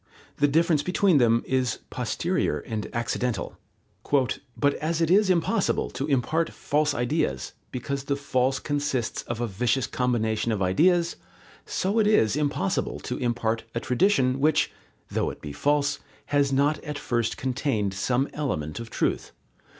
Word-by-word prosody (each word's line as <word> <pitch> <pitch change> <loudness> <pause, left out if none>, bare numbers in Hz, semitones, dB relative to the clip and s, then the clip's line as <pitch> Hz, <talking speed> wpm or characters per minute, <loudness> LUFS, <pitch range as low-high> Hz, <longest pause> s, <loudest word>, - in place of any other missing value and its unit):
The 145 - +4
difference 160 +1 +3
between 180 -2 +3
them 115 -1 +3
is 130 -3 0
posterior 75 - -1
and 110 -2 -4
accidental. 120 -1 -2 1.0
"But, 145 -1 +2
as 160 +1 0
it 165 0 +2
is 200 +1 +5
impossible 185 +4 +1
to 135 +3 -3
impart 150 +4 +1
false 150 0 0
ideas, 120 - -1 0.2
because 140 +2 -4
the 140 - 0
false 135 -1 0
consists 145 -5 -2
of 120 -1 -5
a 120 - 0
vicious 120 +4 0
combination 115 -2 0
of 110 - -1
ideas, 170 - +3 0.5
so 200 +4 0
it 210 - +4
is 130 - +4
impossible 150 +6 -1
to 125 - -4
impart 115 -2 -1
a - - +1
tradition, 130 -2 +2
which, 155 +2 +2 0.4
though - - 0
it - - -8
be 75 - -7
false, 145 - +1 0.3
has 140 -1 +3
not 140 +3 +2
at 150 -2 -4
first 120 -5 -1
contained 125 -6 -1
some 125 +8 0
element 75 - -3
of 115 -1 -7
truth. - - -1
135 Hz, 150 wpm, -26 LUFS, 120-150 Hz, 1.0 s, is